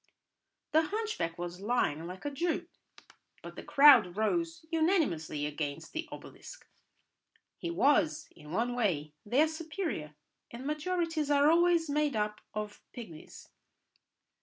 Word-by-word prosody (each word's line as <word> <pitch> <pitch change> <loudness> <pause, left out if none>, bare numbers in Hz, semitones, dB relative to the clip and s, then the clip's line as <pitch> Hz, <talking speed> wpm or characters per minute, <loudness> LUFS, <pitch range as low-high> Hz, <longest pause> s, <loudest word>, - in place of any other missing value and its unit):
The 315 - +5
hunchback 415 - -3
was 175 +1 -6
lying 195 -8 0
like 185 +6 -9
a 290 - -1
Jew, 340 +4 -1 0.8
but - - -9
the - - -7
crowd 275 -11 +6
rose 330 +8 -1
unanimously 300 - +1
against 150 +1 -4
the 320 - -4
obelisk. - - -11 0.9
He 345 - -4
was, 280 - +2
in 150 - -14
one 230 +8 0
way, 165 -11 -1
their 280 +9 +4
superior, 315 - -4 0.3
and 240 +3 -9
majorities 315 0 -1
are 290 +1 +5
always 340 -1 +3
made 295 -2 0
up 210 0 -2
of 210 -1 -5
pigmies. 175 -11 -11
275 Hz, 125 wpm, -31 LUFS, -, 0.9 s, crowd